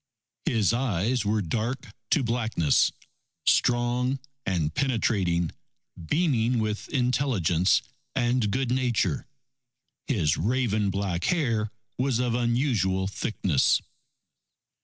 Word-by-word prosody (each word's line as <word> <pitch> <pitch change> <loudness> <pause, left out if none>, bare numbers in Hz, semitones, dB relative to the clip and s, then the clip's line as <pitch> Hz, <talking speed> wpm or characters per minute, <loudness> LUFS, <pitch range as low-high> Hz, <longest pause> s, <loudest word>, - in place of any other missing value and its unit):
His 110 -3 +2
eyes 120 -1 0
were 105 0 +1
dark 115 +7 -3 0.2
to 140 - +3
blackness, 115 - +2 0.5
strong 125 +2 +2 0.3
and 80 -5 0
penetrating, 95 - +1 0.6
beaming 125 - +2
with 110 -1 -2
intelligence 120 - +2 0.3
and 120 -2 +1
good 130 +2 -1
nature. 125 -2 0 0.8
His 80 - +1
raven 110 -1 +1
black 95 -3 -2
hair 115 -11 +1 0.3
was 130 -2 +1
of 125 -1 0
unusual 120 -6 +1
thickness. 95 -7 +1
115 Hz, 95 wpm, -26 LUFS, 100-125 Hz, 0.8 s, to